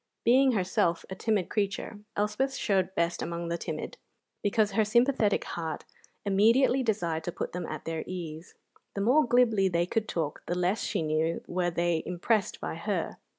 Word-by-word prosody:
Being 260 Hz, +2 st, +5 dB
herself 180 Hz, -4 st, +1 dB
a -, -, -3 dB
timid 210 Hz, -2 st, 0 dB
creature, 205 Hz, 0 st, -2 dB, 0.2 s
Elspeth 215 Hz, +7 st, 0 dB
showed 190 Hz, -2 st, 0 dB
best 170 Hz, 0 st, 0 dB
among 170 Hz, 0 st, -3 dB
the 170 Hz, -, -1 dB
timid, -, -, -5 dB, 0.4 s
because 210 Hz, 0 st, +2 dB
her 220 Hz, +2 st, +3 dB
sympathetic 235 Hz, -1 st, +2 dB
heart 160 Hz, -3 st, -5 dB, 0.4 s
immediately 230 Hz, +7 st, +4 dB
desired 175 Hz, -9 st, -1 dB
to 175 Hz, -, -2 dB
put -, -, -4 dB
them 180 Hz, -1 st, -4 dB
at -, -, -6 dB
their 165 Hz, -1 st, -3 dB
ease. 170 Hz, -1 st, -7 dB, 0.4 s
The 200 Hz, -, -1 dB
more 255 Hz, +7 st, +4 dB
glibly 230 Hz, -5 st, +4 dB
they 170 Hz, -1 st, +1 dB
could 215 Hz, +4 st, -1 dB
talk, 155 Hz, -4 st, -3 dB
the 175 Hz, -, -1 dB
less, 180 Hz, +4 st, +1 dB
she -, -, -1 dB
knew, 155 Hz, +2 st, 0 dB
were 175 Hz, 0 st, 0 dB
they 170 Hz, -1 st, 0 dB
impressed 195 Hz, +4 st, 0 dB
by -, -, -4 dB
her. -, -, -2 dB
190 Hz, 170 wpm, -29 LUFS, 170-220 Hz, 0.4 s, Being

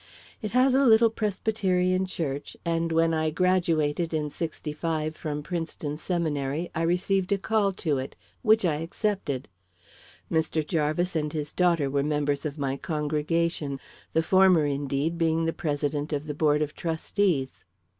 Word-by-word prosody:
It 215 Hz, -, -3 dB
has 255 Hz, +1 st, +4 dB
a 270 Hz, +1 st, +4 dB
little 225 Hz, 0 st, +6 dB
Presbyterian 190 Hz, -4 st, 0 dB
church, 145 Hz, -6 st, -4 dB
and 165 Hz, 0 st, 0 dB
when 165 Hz, 0 st, +3 dB
I 160 Hz, 0 st, +1 dB
graduated 165 Hz, -2 st, +1 dB
in 150 Hz, -1 st, -2 dB
'65 155 Hz, 0 st, -3 dB
from 150 Hz, -1 st, -4 dB
Princeton 160 Hz, -3 st, -3 dB
seminary, 155 Hz, -2 st, -2 dB
I 165 Hz, -, -2 dB
received 180 Hz, +3 st, +1 dB
a 200 Hz, -, +3 dB
call 205 Hz, 0 st, +1 dB
to 155 Hz, -7 st, -1 dB
it, 130 Hz, -, -6 dB, 0.3 s
which 220 Hz, -3 st, +4 dB
I 155 Hz, -4 st, +1 dB
accepted. 165 Hz, -, -2 dB, 0.8 s
Mr. 160 Hz, -1 st, +1 dB
Jarvis 160 Hz, +3 st, 0 dB
and 150 Hz, -1 st, 0 dB
his 150 Hz, -1 st, -4 dB
daughter 170 Hz, -5 st, +2 dB
were 140 Hz, +1 st, 0 dB
members 145 Hz, 0 st, 0 dB
of 145 Hz, +1 st, -7 dB
my 135 Hz, -1 st, -1 dB
congregation 150 Hz, -1 st, -1 dB, 0.3 s
the 160 Hz, -, +3 dB
former, 185 Hz, -3 st, +5 dB
indeed, 145 Hz, +3 st, -1 dB
being 165 Hz, 0 st, +2 dB
the 165 Hz, -, 0 dB
president 145 Hz, 0 st, -2 dB
of 145 Hz, +1 st, -2 dB
the 150 Hz, -, -4 dB
board 150 Hz, 0 st, +2 dB
of 150 Hz, -, -5 dB
trustees." 165 Hz, -3 st, -1 dB
160 Hz, 150 wpm, -27 LUFS, 150-180 Hz, 0.8 s, little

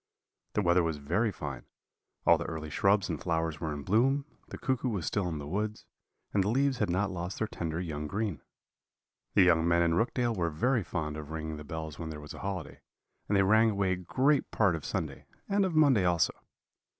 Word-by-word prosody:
"The 105 Hz, -, +1 dB
weather 85 Hz, 0 st, +4 dB
was 80 Hz, -2 st, -1 dB
very 90 Hz, +10 st, 0 dB
fine; 75 Hz, -8 st, -6 dB, 0.6 s
all -, -, +6 dB
the -, -, -3 dB
early 80 Hz, -2 st, -5 dB
shrubs 100 Hz, +5 st, +3 dB
and 80 Hz, -4 st, -3 dB
flowers 80 Hz, -3 st, -1 dB
were 80 Hz, -, -2 dB
in 75 Hz, -1 st, -5 dB
bloom, 130 Hz, -, +2 dB, 0.2 s
the -, -, -8 dB
cuckoo 130 Hz, -1 st, -1 dB
was 100 Hz, -8 st, -2 dB
still 95 Hz, -4 st, 0 dB
in 80 Hz, -, -3 dB
the 75 Hz, -, -6 dB
woods, 105 Hz, +7 st, -3 dB, 0.5 s
and 100 Hz, -, +3 dB
the 100 Hz, -, 0 dB
leaves 135 Hz, +2 st, +2 dB
had 105 Hz, -, +1 dB
not 95 Hz, +3 st, 0 dB
lost 90 Hz, +1 st, -4 dB
their 110 Hz, -, -1 dB
tender 80 Hz, -5 st, -4 dB
young 75 Hz, -4 st, -4 dB
green. 100 Hz, -, -2 dB, 0.9 s
"The 95 Hz, -, +7 dB
young 85 Hz, -2 st, +4 dB
men 85 Hz, 0 st, +4 dB
in 85 Hz, -1 st, +2 dB
Rookdale 120 Hz, +5 st, +1 dB
were 85 Hz, -3 st, 0 dB
very 115 Hz, -, +1 dB
fond 75 Hz, -4 st, -3 dB
of 75 Hz, -1 st, -7 dB
ringing 80 Hz, -1 st, -4 dB
the 75 Hz, -, -8 dB
bells 80 Hz, -1 st, -6 dB
when 80 Hz, -1 st, -4 dB
there 75 Hz, -1 st, -6 dB
was 75 Hz, 0 st, -9 dB
a -, -, -9 dB
holiday, 90 Hz, -6 st, -5 dB, 0.5 s
and 100 Hz, -, +2 dB
they 95 Hz, -, +5 dB
rang 110 Hz, +3 st, +5 dB
away 100 Hz, -3 st, +1 dB
great 130 Hz, -, +1 dB
part 100 Hz, -6 st, +2 dB
of 80 Hz, -, -6 dB
Sunday -, -, -4 dB, 0.2 s
and 200 Hz, 0 st, +2 dB
of 180 Hz, -4 st, -2 dB
Monday 140 Hz, -10 st, +5 dB
also. 85 Hz, -2 st, +2 dB
90 Hz, 210 wpm, -30 LUFS, 80-110 Hz, 0.9 s, The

